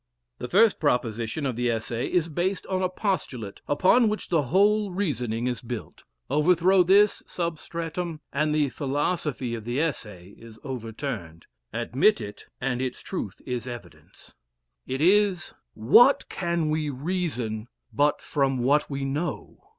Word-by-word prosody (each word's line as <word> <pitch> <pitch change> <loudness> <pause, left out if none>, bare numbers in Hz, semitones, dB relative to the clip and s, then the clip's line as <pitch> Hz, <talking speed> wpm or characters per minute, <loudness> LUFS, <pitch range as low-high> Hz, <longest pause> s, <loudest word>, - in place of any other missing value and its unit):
The - - -4
first 215 +3 +4
proposition 120 -1 0
of 130 -3 -1
the 120 +1 0
Essay 115 +1 -2
is 175 -2 +2
based 175 +5 -2
on 190 -1 -1
a 185 - +1
postulate, 145 - -3
upon 200 +10 +4
which 215 - -4
the 165 -3 +3
whole 200 - +3
reasoning 125 - -2
is 125 -2 -2
built. 120 -2 -7 0.2
Overthrow 175 +6 +4
this 195 +4 +4
substratum, 170 0 -4
and 150 +2 +1
the 150 -2 +2
philosophy 145 -2 -2
of 115 -2 -5
the 120 +4 -2
Essay 105 - -3
is 115 -1 -13
overturned 115 - -6 0.3
admit 205 - +2
it, 105 0 -8
and 125 -1 -1
its 130 -1 -3
truth 140 - -6
is 125 -1 -3
evident; 120 -8 -11 0.5
it 130 +2 -3
is 190 0 +3 0.2
"What 195 - +5
can 170 -3 -1
we 155 -1 0
reason 130 -7 -3 0.3
but 145 +1 +2
from 135 -3 0
what 140 +5 +2
we 140 -1 -3
know?" 150 +6 -4
145 Hz, 145 wpm, -26 LUFS, 120-175 Hz, 0.5 s, What